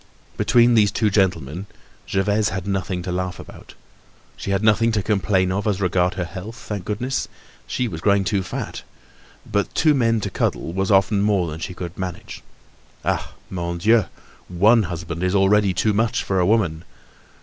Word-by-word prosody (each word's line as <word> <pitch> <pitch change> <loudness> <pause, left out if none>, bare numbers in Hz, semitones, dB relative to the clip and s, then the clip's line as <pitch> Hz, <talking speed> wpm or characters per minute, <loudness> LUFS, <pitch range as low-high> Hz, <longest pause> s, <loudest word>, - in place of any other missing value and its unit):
Between 120 0 +4
these 105 -3 +5
two 105 0 0
gentlemen, 90 -3 0 0.4
Gervaise 105 +2 +1
had 95 0 -4
nothing 95 -2 -2
to 90 - -4
laugh 90 0 -3
about. - - -12 0.6
She - - -6
had 100 +1 0
nothing 110 +1 +4
to 105 -2 0
complain 95 -3 +1
of 100 +3 -1
as 100 -2 0
regards 90 -1 +1
her 90 - -2
health, 100 +6 -8
thank 105 -5 -6
goodness! 125 +6 -2 0.4
She 125 - -1
was 80 -6 -6
growing 100 0 +3
too 95 +1 0
fat. 95 - -5 0.6
But 100 0 -2
two 155 -1 +4
men 115 -4 +2
to 100 - -3
coddle 85 - -1
was 95 +1 -1
often 100 +1 +3
more 100 -4 +2
than 80 - -7
she 90 +1 -5
could 90 -1 -6
manage. 90 -2 -6 0.6
Ah! - - -1 0.2
Mon 85 -2 -3
Dieu! 110 +3 +4 0.4
one 105 +6 +4
husband 85 -1 -5
is 90 +1 +1
already 100 0 +4
too 105 +4 +1
much 110 +2 +1
for 95 -1 0
a 90 - +2
woman! 95 -7 +1
95 Hz, 175 wpm, -22 LUFS, 90-105 Hz, 0.6 s, these